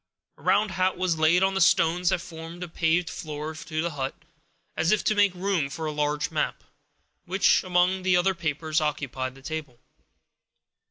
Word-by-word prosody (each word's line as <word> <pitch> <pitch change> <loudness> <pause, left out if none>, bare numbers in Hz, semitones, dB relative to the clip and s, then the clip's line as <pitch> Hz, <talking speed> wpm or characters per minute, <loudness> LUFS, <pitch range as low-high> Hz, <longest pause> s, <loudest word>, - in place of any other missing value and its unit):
A - - -21
round 210 -1 +2
hat 185 0 0
was 180 -3 0
laid 165 +4 +4
on 195 0 +2
the 195 - 0
stones 170 +1 +3
that - - 0
formed 165 0 -8
a - - -5
paved 165 +1 +1
floor 155 0 -5
to 155 0 -4
the 170 - -2
hut, 135 -2 -4 0.6
as 160 +3 +1
if 215 - +2
to - - +2
make 205 -3 +3
room 180 -6 0
for 160 +3 -5
a 155 - -1
large 150 +1 -1
map, 155 - -2 0.6
which, 190 +3 +3
among 180 +1 +2
the 185 -1 +3
other 190 +2 +2
papers, 160 -2 -1
occupied 135 -4 -3
the 135 - -16
table. 150 -5 -5
165 Hz, 180 wpm, -26 LUFS, 155-185 Hz, 0.6 s, laid